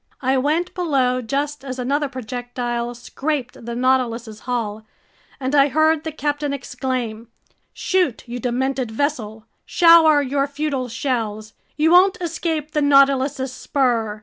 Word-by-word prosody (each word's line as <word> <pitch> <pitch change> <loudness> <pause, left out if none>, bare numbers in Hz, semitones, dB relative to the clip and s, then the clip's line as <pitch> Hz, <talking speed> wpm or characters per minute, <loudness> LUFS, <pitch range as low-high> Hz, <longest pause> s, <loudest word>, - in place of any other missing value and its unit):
I 260 +1 +2
went 305 +7 0
below 270 -8 +1
just 280 +4 -3
as 260 -2 -6
another 280 +3 -1
projectile 245 -1 -4
scraped 255 0 -4
the 235 0 -4
Nautilus's 240 -3 0
hull, 220 -4 -3 0.6
and 260 0 -3
I 280 -1 +5
heard 315 +2 +2
the 320 - -3
captain 290 -1 -2
exclaim: 245 -4 -4 0.4
"Shoot, 360 -11 -1
you 245 +1 -5
demented 255 +1 -1
vessel! 220 -4 -3 0.2
Shower 330 -4 +6
your 275 +1 0
futile 285 -3 -3
shells! 225 -3 -3 0.2
You 315 +2 +3
won't 375 +4 +6
escape 325 -3 -3
the 300 - 0
Nautilus's 275 -2 +3
spur! 235 -7 -1
265 Hz, 130 wpm, -21 LUFS, 240-295 Hz, 0.6 s, Shower